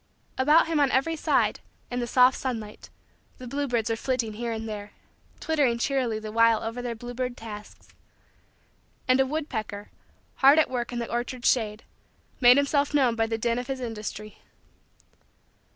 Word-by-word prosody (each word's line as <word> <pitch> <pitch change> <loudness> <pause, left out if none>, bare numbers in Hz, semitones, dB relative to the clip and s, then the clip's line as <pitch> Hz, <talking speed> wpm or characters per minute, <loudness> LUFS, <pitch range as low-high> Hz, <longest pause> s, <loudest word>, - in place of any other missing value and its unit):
About 300 +5 +4
him 325 -2 0
on 285 -2 +4
every 275 +6 +1
side, 310 - +1 0.3
in 245 - -2
the 240 - -2
soft 250 +1 +5
sunlight, 225 -5 -5 0.5
the 255 - -10
bluebirds 245 -3 -1
were 225 - 0
flitting 230 -2 -2
here 235 +2 -4
and 225 0 -4
there, 210 -1 -7 0.5
twittering 285 -7 +1
cheerily 250 -3 0
the 215 0 -7
while 230 0 +3
over 230 +2 -4
their 240 -1 -4
bluebird 245 +2 -5
tasks. 210 -2 -10 1.2
And 255 +1 +4
a 265 - +3
woodpecker, 220 -9 -4 0.5
hard 275 +3 +6
at 315 - +3
work 240 -2 -3
in 240 - -4
the 235 -1 -4
orchard 240 +1 -3
shade, 220 -3 +1 0.6
made 245 +1 +7
himself 285 +1 +1
known 260 -5 +3
by 225 0 +1
the 225 0 -2
din 235 +1 0
of 245 - -6
his 270 -1 -3
industry. 215 -3 -6
245 Hz, 165 wpm, -26 LUFS, 225-265 Hz, 1.2 s, made